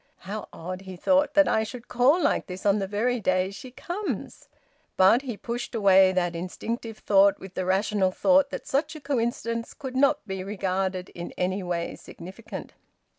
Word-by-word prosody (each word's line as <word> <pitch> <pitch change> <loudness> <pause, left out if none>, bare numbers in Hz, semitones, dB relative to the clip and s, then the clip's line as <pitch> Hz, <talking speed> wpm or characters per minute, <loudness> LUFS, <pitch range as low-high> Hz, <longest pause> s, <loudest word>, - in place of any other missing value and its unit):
"How 210 +2 -5
odd," 185 +3 -6
he 190 -1 -9
thought, 280 +10 +2
"that 295 -1 +6
I 220 - +2
should 235 +2 -8
call 260 +8 +4
like - - +1
this 185 +2 -8
on 200 +1 +4
the 195 - -2
very 235 +5 0
day 185 -1 +1
she 200 +6 -9
comes!" 350 +10 -5 0.5
But 190 +7 +6
he 245 -6 -5
pushed 240 +3 -5
away 195 -3 +6
that 175 -2 0
instinctive 225 +6 -5
thought 200 -1 +4
with 190 -1 -11
the 185 - -2
rational 195 +1 +2
thought 280 +8 +3
that - - -6
such 290 +3 -1
a - - -7
coincidence 235 -4 -2
could 265 -3 -7
not 275 -3 +3
be 190 -2 -4
regarded 190 -2 -2
as - - -20
in 175 0 -7
any 185 +2 -1
way 175 -2 -3
significant. 190 +6 -9
205 Hz, 180 wpm, -26 LUFS, 185-245 Hz, 0.5 s, that